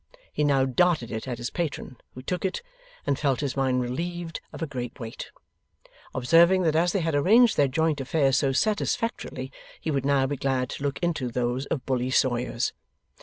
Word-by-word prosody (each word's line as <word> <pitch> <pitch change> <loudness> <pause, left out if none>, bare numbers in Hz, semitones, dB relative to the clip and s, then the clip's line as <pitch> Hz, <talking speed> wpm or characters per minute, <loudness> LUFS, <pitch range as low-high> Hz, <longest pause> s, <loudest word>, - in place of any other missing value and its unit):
He 150 - 0
now 140 -2 +3
darted 145 -2 +2
it 110 +2 -4
at 125 -2 -3
his 120 +1 -4
patron, 150 -6 -4 0.2
who 130 - -9
took 180 +6 -3
it, 190 - -2 0.4
and 140 - 0
felt 140 -3 +1
his 140 -2 -2
mind 130 -2 +1
relieved 170 +6 -4
of - - -6
a - - +1
great 125 -3 -6
weight: 115 -2 -7 0.9
observing 170 +8 +5
that 160 -2 +2
as 170 +2 +3
they 195 - 0
had 165 -1 -1
arranged 215 +11 +5
their 140 - +4
joint 155 +1 0
affairs 135 0 +2
so 135 -1 +2
satisfactorily, 205 - -1 0.3
he 160 - -3
would 135 -3 0
now 140 -1 +3
be 140 +1 -2
glad 130 -2 -1
to - - -6
look 140 -1 -1
into 160 -7 0
those 125 +2 -1
of 140 - -3
Bully 130 -1 0
Sawyers. 125 -2 +1
140 Hz, 190 wpm, -26 LUFS, 130-165 Hz, 0.9 s, observing